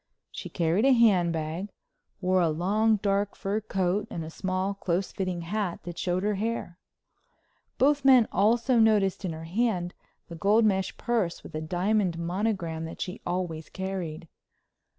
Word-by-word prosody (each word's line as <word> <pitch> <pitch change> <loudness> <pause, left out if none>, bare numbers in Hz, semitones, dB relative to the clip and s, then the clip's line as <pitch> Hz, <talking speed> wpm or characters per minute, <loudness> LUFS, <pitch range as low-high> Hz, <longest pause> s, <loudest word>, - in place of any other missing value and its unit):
She - - -7
carried 170 +4 +1
a 270 - +6
hand 200 -8 +4
bag, 165 +5 -3 0.5
wore 185 0 +2
a 170 - +3
long 205 +8 +2
dark 200 0 0
fur 205 +3 -2
coat 195 0 -1
and 165 - -5
a 160 - -8
small 185 +2 -2
close 190 -1 -2
fitting 185 -3 -3
hat 185 +1 -3
that 175 -1 -7
showed 180 +1 -1
her 210 +1 +1
hair. 205 -4 -3 1.0
Both 285 +1 +3
men 260 -4 +6
also 230 +5 +3
noticed 205 -4 +3
in 170 - -2
her 160 0 -8
hand 180 -1 -1 0.3
the 170 - -9
gold 205 +6 +3
mesh 190 -2 0
purse 225 -8 -1
with - - -11
a 155 - -3
diamond 180 +2 0
monogram 170 -2 -2
that 165 - -8
she 180 - -5
always 175 -3 -3
carried. 185 -4 -5
190 Hz, 160 wpm, -27 LUFS, 170-210 Hz, 1.0 s, a